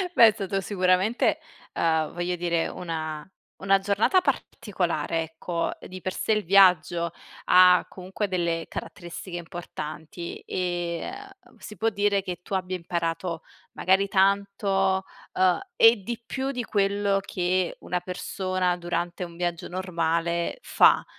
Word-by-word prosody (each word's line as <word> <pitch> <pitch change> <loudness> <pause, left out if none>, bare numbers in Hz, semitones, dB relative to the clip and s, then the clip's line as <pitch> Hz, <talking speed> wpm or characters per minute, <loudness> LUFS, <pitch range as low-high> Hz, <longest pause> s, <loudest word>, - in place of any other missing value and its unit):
Beh, 230 - +9
è 220 - +5
stato 195 -1 -2
sicuramente 185 +3 +2 0.3
uhm, 160 -2 +1
voglio 175 +1 -2
dire 170 -1 0
una 160 -3 -5 0.3
una 195 0 +3
giornata 205 - +3
particolare, 180 - -1
ecco. 165 +1 -3
Di 185 0 -9
per 185 - -2
sé 220 - 0
il 215 - 0
viaggio 175 -2 +4 0.3
ha 180 -1 +6
comunque 190 +3 -4
delle 170 -3 -1
caratteristiche 175 +1 -7
importanti 170 -1 -7
e, 175 - -3 0.4
uhm, - - -21
si 210 - -10
può 225 - 0
dire 205 -1 +1
che 180 -2 -5
tu 195 - -4
abbia 185 0 -2
imparato 170 -1 -3 0.3
magari 190 +2 +2
tanto, 195 -1 +2 0.3
uhm, 185 -1 +3 0.2
e 225 +1 +8
di 235 +2 -5
più 270 0 -2
di 250 -2 -3
quello 200 -1 +1
che 180 -1 -1
una 180 0 -2
persona 185 0 -2
durante 175 +1 -3
un 170 -1 -9
viaggio 175 -1 -3
normale 170 - -1
fa. - - +4
180 Hz, 135 wpm, -26 LUFS, 170-195 Hz, 0.4 s, Beh